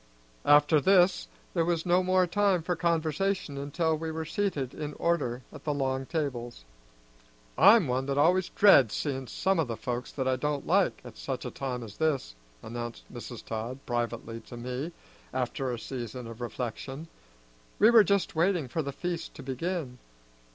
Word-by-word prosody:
After 145 +1 +6
this 180 - +4 0.3
there 165 - +2
was 165 -1 0
no 180 +1 +4
more 185 0 +3
time 190 -1 +2
for 180 +1 -1
conversation 165 0 0
until 150 +4 0
we 160 +1 -4
were 160 0 -4
seated 155 -7 -2
in 150 -1 -5
order 130 -8 0
at 145 - -11
the 150 -2 -1
long 135 -1 -1
tables. 120 - -3 0.9
"I'm 195 - +7
one 130 +2 -1
that 140 0 -1
always 175 +5 +3
dreads 140 - +6
seeing 135 -3 -2
some 190 +6 0
o' - - +4
the 115 -5 -5
folks 125 -1 -4
that 130 -2 -2
I 130 0 +2
don't 145 +1 -2
like, - - +2
at - - -11
such - - -4
a - - -4
time 125 -3 -4
as 105 -3 -10
this," 150 - 0 0.3
announced 120 +1 -7
Mrs. 120 -1 -8
Todd 115 +3 -4
privately 120 -1 -3
to 120 - -9
me 125 +7 -4 0.4
after 130 +1 -1
a 120 - -3
season 120 0 -6
of 115 +1 -9
reflection. 130 +5 -5 0.7
We 220 +3 +6
were 230 -2 +8
just 200 -5 +1
waiting 170 -3 +2
for 160 +6 -2
the 140 -2 -4
feast 170 +3 -4
to 140 - -9
begin. 135 -1 -3
145 Hz, 170 wpm, -29 LUFS, 125-170 Hz, 0.9 s, were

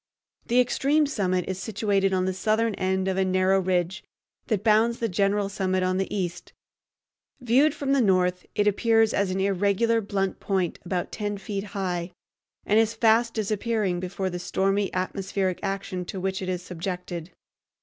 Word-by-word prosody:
The 245 +2 +3
extreme 280 +5 +2
summit 185 - 0
is 190 0 -3
situated 200 -2 0
on 185 -1 +1
the 190 - 0
southern 220 +4 +1
end 190 0 -1
of 190 0 0
a 190 - +3
narrow 185 +1 +2
ridge 180 0 -1 0.4
that 210 -5 0
bounds 225 +2 +3
the 230 - -1
general 200 +1 +1
summit 185 -2 -1
on 185 0 +1
the 195 - -2
east. 175 -3 -4 0.9
Viewed 265 +5 +3
from 275 -1 -2
the 275 -1 +4
north, 180 -3 +2
it 205 - +2
appears 225 +1 +3
as 200 -1 +1
an 185 +1 -2
irregular 200 +4 +2
blunt 195 -2 -2
point 190 -4 -1
about 180 0 -3
ten 205 -1 -3
feet 195 0 -4
high, 180 -2 -2 0.5
and 210 +2 +4
is 225 0 +1
fast 230 +1 +3
disappearing 215 -3 -1
before 185 +1 -3
the 180 - -4
stormy 195 +2 0
atmospheric 185 0 -2
action 195 -2 -3
to 190 - -6
which 190 +1 -2
it 185 - -3
is 180 -1 -3
subjected. 180 -1 -5
195 Hz, 170 wpm, -26 LUFS, 185-215 Hz, 0.9 s, the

